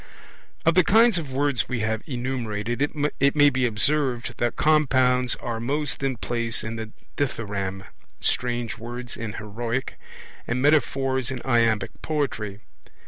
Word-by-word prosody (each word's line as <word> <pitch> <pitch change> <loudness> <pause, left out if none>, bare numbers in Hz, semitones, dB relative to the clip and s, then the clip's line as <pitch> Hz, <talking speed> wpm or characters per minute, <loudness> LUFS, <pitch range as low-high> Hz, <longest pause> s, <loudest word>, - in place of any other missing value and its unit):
Of 165 - +5
the 185 - +5
kinds 220 0 +5
of 145 -5 -6
words 135 -2 0
we 125 -3 -1
have 110 0 -1
enumerated 120 -3 -3
it 145 -1 +1
may 145 -1 +7
be 125 -1 +2
observed 120 +2 0
that 120 -1 0
compounds 130 -5 +3
are 115 -1 -4
most 145 +6 -1
in 135 -2 -1
place 115 -1 -1
in 110 +1 -4
the 110 -1 -5 0.3
dithyramb, 100 -8 -2 0.4
strange 120 -2 -1
words 120 +1 -6
in 115 -2 -5
heroic, 115 +5 -4 0.5
and 125 +2 0
metaphors 135 -3 +2
in 130 -1 -4
iambic 115 -5 +2
poetry. 115 -9 -2
125 Hz, 140 wpm, -25 LUFS, 115-140 Hz, 0.5 s, may